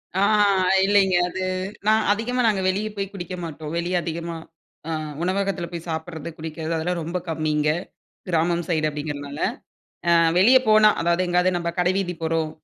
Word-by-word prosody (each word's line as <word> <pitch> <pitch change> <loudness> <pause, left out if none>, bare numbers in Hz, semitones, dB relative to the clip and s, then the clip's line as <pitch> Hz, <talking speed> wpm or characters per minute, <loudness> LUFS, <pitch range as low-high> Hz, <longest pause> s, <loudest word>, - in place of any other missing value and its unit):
ஆ 190 - +1 0.6
இல்லைங்க. 195 -2 +3
அது 190 - -5 0.5
நான் 220 0 +3
அதிகமா 245 +4 0
நாங்க 200 -3 +1
வெளிய 205 +3 -1
போய் 195 -1 -4
குடிக்க 180 -1 -6
மாட்டோம். 155 -1 -7
வெளிய 175 +2 -1
அதிகமா 170 0 -4 0.9
உணவகத்துல 190 -1 -1
போய் 170 0 -7
சாப்பிடறது 160 0 -5
,குடிக்கிறது 160 +1 -4
அதெல்லாம் 170 +2 -2
ரொம்ப 170 +3 -3
கம்மிங்க. 155 -1 0 0.6
கிராமம் 170 0 +1
சைடு 155 -3 +1
அப்படிங்கிறதுனால. 145 0 -6 1.0
வெளியே 250 +8 +7
போனா, 215 0 +7
அதாவது 170 +2 +2
எங்கேயாவது 180 +1 +2
நம்ம 170 0 -2
கடை 180 +1 +3
வீதி 185 -2 -1
போறோம். 160 -1 0
175 Hz, 140 wpm, -23 LUFS, 160-190 Hz, 1.0 s, வெளியே